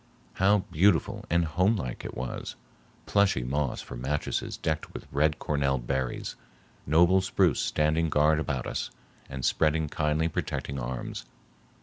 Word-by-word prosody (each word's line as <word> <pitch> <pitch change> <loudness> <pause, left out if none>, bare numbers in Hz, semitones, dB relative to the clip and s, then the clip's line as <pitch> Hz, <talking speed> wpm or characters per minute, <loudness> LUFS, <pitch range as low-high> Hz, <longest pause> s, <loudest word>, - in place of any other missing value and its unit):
How 100 +1 +3
beautiful 95 +6 +2
and 85 0 +3
homelike 90 - 0
it - - -7
was! 65 0 -5 0.5
plushy 100 -11 +2
moss 70 +2 -1
for - - -8
mattresses 70 +5 -2
decked 80 -1 -3
with - - -7
red 75 +2 +2
corner 70 -2 0
berries, 65 0 -3 0.5
noble 85 +5 +5
spruce 95 -5 +2
standing 80 +2 +1
guard 75 +1 +3
about 70 -5 -2
us - - -3 0.4
and 65 -2 -4
spreading 80 -1 +2
kindly 75 +2 +1
protecting 70 -3 -3
arms. 60 0 -5
75 Hz, 130 wpm, -28 LUFS, 70-85 Hz, 0.5 s, noble